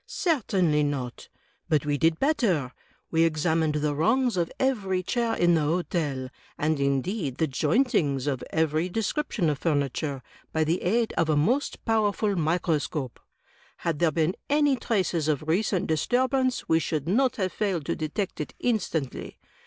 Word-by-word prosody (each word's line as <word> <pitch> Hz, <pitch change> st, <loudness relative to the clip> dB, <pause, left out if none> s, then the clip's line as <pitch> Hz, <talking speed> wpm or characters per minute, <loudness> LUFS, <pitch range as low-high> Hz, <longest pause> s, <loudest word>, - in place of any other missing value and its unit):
"Certainly 190 Hz, -, +1 dB
not; 140 Hz, -4 st, -3 dB, 0.4 s
but 150 Hz, -1 st, +2 dB
we 145 Hz, -1 st, +1 dB
did 165 Hz, 0 st, +3 dB
better 205 Hz, -, +1 dB, 0.2 s
— -, -, -31 dB
^we 165 Hz, 0 st, +4 dB
examined 160 Hz, -1 st, +1 dB
the 150 Hz, 0 st, 0 dB
rungs 230 Hz, -, +2 dB
of 170 Hz, -2 st, -1 dB
every 195 Hz, -9 st, 0 dB
chair 235 Hz, +3 st, 0 dB
in 175 Hz, 0 st, +3 dB
the 160 Hz, -, +3 dB
Hotel, 150 Hz, -4 st, -1 dB, 0.3 s
and, 155 Hz, 0 st, 0 dB
indeed, 140 Hz, -, -1 dB
the 160 Hz, -, +2 dB
jointings 150 Hz, -, +1 dB
of 135 Hz, -4 st, -2 dB
every 160 Hz, +2 st, 0 dB
descrip 225 Hz, +9 st, -1 dB
tion 170 Hz, -, 0 dB
of 145 Hz, -2 st, 0 dB
furniture, 145 Hz, -3 st, -1 dB, 0.3 s
by 160 Hz, -, +1 dB
the 165 Hz, +3 st, 0 dB
aid 225 Hz, +5 st, +1 dB
of 165 Hz, -1 st, +2 dB
a 155 Hz, -, +3 dB
most 245 Hz, -, 0 dB
powerful 215 Hz, -2 st, +1 dB
microscope. 155 Hz, -5 st, -1 dB, 0.6 s
Had 165 Hz, -3 st, -2 dB
there 170 Hz, -, +4 dB
been 160 Hz, +4 st, 0 dB
any 290 Hz, -1 st, +3 dB
traces 185 Hz, -, 0 dB
of 155 Hz, -2 st, 0 dB
recent 185 Hz, +2 st, +1 dB
disturbance 255 Hz, -, +1 dB
we 160 Hz, -, +4 dB
should 155 Hz, -2 st, -2 dB
not 250 Hz, +8 st, +2 dB
have 185 Hz, -4 st, -2 dB
failed 190 Hz, -8 st, -1 dB
to -, -, -1 dB
detect 155 Hz, +4 st, -3 dB
it 150 Hz, -, -6 dB
instantly. 175 Hz, -, -2 dB
165 Hz, 160 wpm, -26 LUFS, 150-210 Hz, 0.6 s, ^we